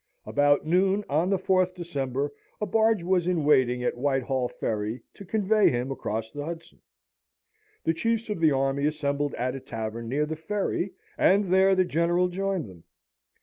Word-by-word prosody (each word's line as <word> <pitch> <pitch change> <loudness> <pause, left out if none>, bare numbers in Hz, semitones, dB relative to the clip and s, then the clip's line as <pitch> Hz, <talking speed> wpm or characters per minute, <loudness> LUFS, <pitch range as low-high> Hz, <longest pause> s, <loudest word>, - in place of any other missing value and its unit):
About 145 0 +2
noon, 190 +5 +2
on 160 +6 +1
the 195 - +2
4th 185 -1 +1
December, 145 -5 -3 0.3
a 210 - -1
barge 220 -1 +2
was 180 -1 +1
in 170 -5 0
waiting 125 -4 +3
at - - 0
Whitehall 135 -2 0
Ferry 110 +1 -3
to - - -11
convey 210 +1 +3
him 125 +2 -2
across 110 -3 -4
the 145 - -5
Hudson. 165 +1 -8 1.0
The 165 - +2
chiefs 230 +6 -1
of 210 -4 -3
the 160 -2 +4
army 135 +1 +1
assembled 145 -1 -1
at 125 +1 -2
a 135 - -5
tavern 115 -1 -5
near 145 +4 +1
the 160 +1 -4
ferry, 190 +2 -2 0.3
and 195 -1 +3
there 190 0 +5
the 185 0 +3
General 175 +2 +1
joined 190 - -2
them. 90 -4 -14
160 Hz, 170 wpm, -26 LUFS, 135-185 Hz, 1.0 s, there